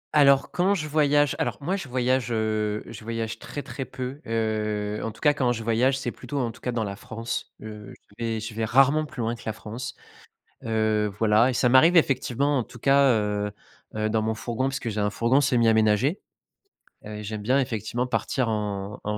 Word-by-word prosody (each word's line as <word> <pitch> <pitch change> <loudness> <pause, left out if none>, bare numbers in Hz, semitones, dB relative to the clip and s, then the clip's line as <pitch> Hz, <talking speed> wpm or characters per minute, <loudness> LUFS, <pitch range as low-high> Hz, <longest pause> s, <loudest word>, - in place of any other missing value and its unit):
Alors, 140 -2 +5
quand 190 +3 +2
je 155 -5 -3
voyage 145 -2 +3
alors, 120 -4 -1
moi, 180 +7 -1
je 180 -9 -6
voyage, 125 -1 0
heu, 110 -1 -1
je - - -10
voyage 115 0 -4
très, 145 - -6
très 135 - -5
peu. 130 +2 -6
Heu, 105 -2 -1
en - - -2
tout 115 - -18
cas, 150 - +5
quand 125 -4 +1
je 115 -1 -5
voyage, 120 +4 +2
c'est 125 -2 -3
plutôt, 145 - -7
en 120 -4 0
tout 125 - -17
cas, 125 - -2
dans 115 -2 -1
la 100 -1 -4
France. 115 +1 -5
Heu, 105 -1 -9 0.2
je - - -3
vais 115 -1 -1
je 110 +1 -6
vais 110 +1 -3
rarement 135 +7 +4
plus 140 - -7
loin 115 +1 0
que - - -14
la 110 - -1
France. 115 +4 -7 0.7
Heu, 110 -1 +1
voilà 110 +2 +4
et - - -2
ça 125 0 +2
m'arrive, 155 +8 +6
effectivement, 140 -1 +2
en 125 - -1
tout 125 - -14
cas, 140 +1 +5
heu 105 -2 -1 0.4
heu, 110 0 -1
dans 110 0 +1
mon 110 +1 -1
fourgon, 120 +3 -2
puisque 135 -3 -4
j'ai 110 -1 -3
un 105 0 +1
fourgon 115 +6 +2
semi-aménagé. 115 - +3 0.9
Heu 105 0 -7
et 105 - -7
j'aime 105 0 -5
bien, 130 +6 +2
effectivement, 120 0 -2
partir 125 0 -1
en 105 -2 -3
en 105 0 -2
115 Hz, 210 wpm, -25 LUFS, 110-135 Hz, 0.9 s, m'arrive